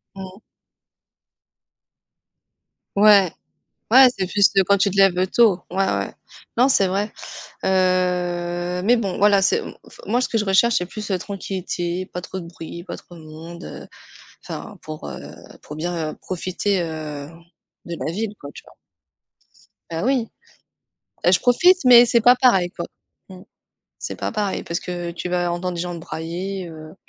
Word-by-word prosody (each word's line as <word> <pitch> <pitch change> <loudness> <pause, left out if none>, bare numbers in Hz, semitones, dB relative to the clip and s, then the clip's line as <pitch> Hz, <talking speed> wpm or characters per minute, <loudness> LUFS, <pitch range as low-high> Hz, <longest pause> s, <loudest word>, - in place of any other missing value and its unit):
Mmh. 190 +1 -9 2.6
Ouais. 200 -3 +6 0.6
Ouais, 260 +3 +9
c'est 190 -1 -1
plus, 200 +2 +4
heu, 195 - +5
quand 200 +2 +3
tu 200 +1 +2
te 195 - -5
lèves, 195 -2 +5
heu, 185 - +2
tôt, 200 -2 +3
ouais, 195 +1 +1
ouais. 100 - -1 0.5
Non, 250 +3 +5
c'est 195 -8 +3
vrai. 200 +3 -2 0.5
Heu, 180 -1 0
mais 240 +5 +4
bon, 195 -5 -2
voilà, 200 -1 +4
c'est 320 - +3
m - - -7
m - - -10 0.2
f - - -18
moi 245 - +1
ce - - 0
que 225 - -1
je 215 - +1
recherche, 205 +5 +3
c'est 180 - -1
plus 210 +3 -7
la 190 - +1
tranquillité, 185 -2 -4
pas 180 - -6
trop 190 +1 -6
de 175 - -8
bruit, 170 0 -9
pas - - -7
trop 175 - -15
de 165 - -12
monde, 165 +2 -10
heu - - -9 0.6
enfin - - -8
pour, 155 - -8
heu, 65 -2 -7 0.4
pour 150 - -9
bien, 165 -1 -3
heu, - - -11
profiter, 185 +2 -2
heu, 155 -3 -5 0.6
de 170 - -5
la 155 - -2
ville, 210 +3 -4
quoi, 140 - -9
tu - - -12
vois? - - -19 1.1
Bah 165 +1 -3
oui, 255 -4 +1 1.0
et 175 - +5
je 180 - +5
profite 350 +8 +4
mais 245 -1 +9
c'est 235 0 +3
pas 245 +2 +7
pareil, 235 -9 +3
quoi. 170 - -6 0.4
Mmh. 185 -1 -12 0.6
C'est - - -5
pas - - -3
pareil 210 -3 -2
parce 170 - -3
que 175 -1 -5
tu 175 +1 -5
vas 175 -1 0
entendre 175 +1 -3
des 170 - -3
gens 180 0 -4
brailler, 175 +3 -5
heu, 155 -1 -11
185 Hz, 175 wpm, -22 LUFS, 175-205 Hz, 2.6 s, Ouais